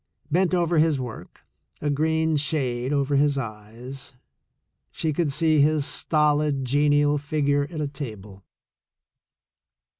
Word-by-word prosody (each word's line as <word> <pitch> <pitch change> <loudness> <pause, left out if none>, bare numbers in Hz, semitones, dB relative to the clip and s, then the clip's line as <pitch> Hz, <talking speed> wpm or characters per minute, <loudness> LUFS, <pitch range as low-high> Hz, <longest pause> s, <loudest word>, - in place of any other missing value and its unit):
Bent 180 +3 +2
over 170 -2 +2
his 155 -3 +2
work, 125 -3 -8 0.4
a 150 - -1
green 160 +2 +1
shade 135 -4 -1
over 140 -1 +1
his 145 0 +2
eyes, 120 +3 -7 0.7
she 155 -1 -2
could 155 -1 0
see 155 0 +3
his 150 0 +2
stolid, 150 -3 +1
genial 145 +2 +2
figure 145 -1 0
at 160 -3 -5
a 150 - -1
table. 105 -9 -8
145 Hz, 120 wpm, -24 LUFS, 135-155 Hz, 0.7 s, see